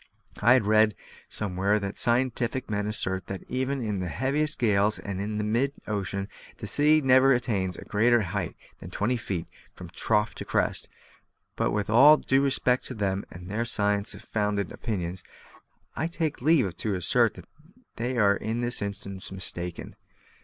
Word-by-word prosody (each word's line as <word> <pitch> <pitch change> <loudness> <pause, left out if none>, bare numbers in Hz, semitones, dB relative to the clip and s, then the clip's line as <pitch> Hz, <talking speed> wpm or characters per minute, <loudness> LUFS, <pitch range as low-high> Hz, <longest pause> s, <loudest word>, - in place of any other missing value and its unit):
I 120 +4 +6
have 130 -5 +3
read 110 0 +4 0.3
somewhere 100 0 0
that 100 -1 -4
scientific 125 0 0
men 105 0 -1
assert 95 -4 -1
that 100 -1 -6
even 130 0 -2
in 105 -3 -2
the 90 - -3
heaviest 140 - 0
gales 105 -2 +2
and 100 -2 -5
in 105 +1 -2
mid 135 +5 +1
ocean 100 -1 -3 0.3
the - - -7
sea 155 +1 +4
never 135 0 +5
attains 100 -7 -1
a - - -10
greater 115 +2 +3
height 95 -1 -3 0.2
than - - -9
twenty 120 +5 -1
feet 95 -7 -4 0.3
from 90 -2 -10
trough 105 +3 0
to - - -2
crest; - - -1 0.7
but - - 0
with 105 -1 -1
all 145 +7 +8
due 135 -1 +1
respect 130 -2 +2
to 130 - -5
them 100 -2 -1
and 90 +1 -11
their 105 +4 -2
science 105 -3 0
founded 105 -2 -2
opinions, 95 -5 -4 0.7
I 160 - -1
take 165 -5 -3
leave 130 - +3
to 105 -3 -2
assert 110 +6 +2
that - - -11 0.5
they 125 +2 -2
are 100 -3 +4
in 110 +3 -3
this 120 -1 -2
instance 100 -1 -6
mistaken. 90 -2 -4
105 Hz, 165 wpm, -27 LUFS, 100-125 Hz, 0.7 s, all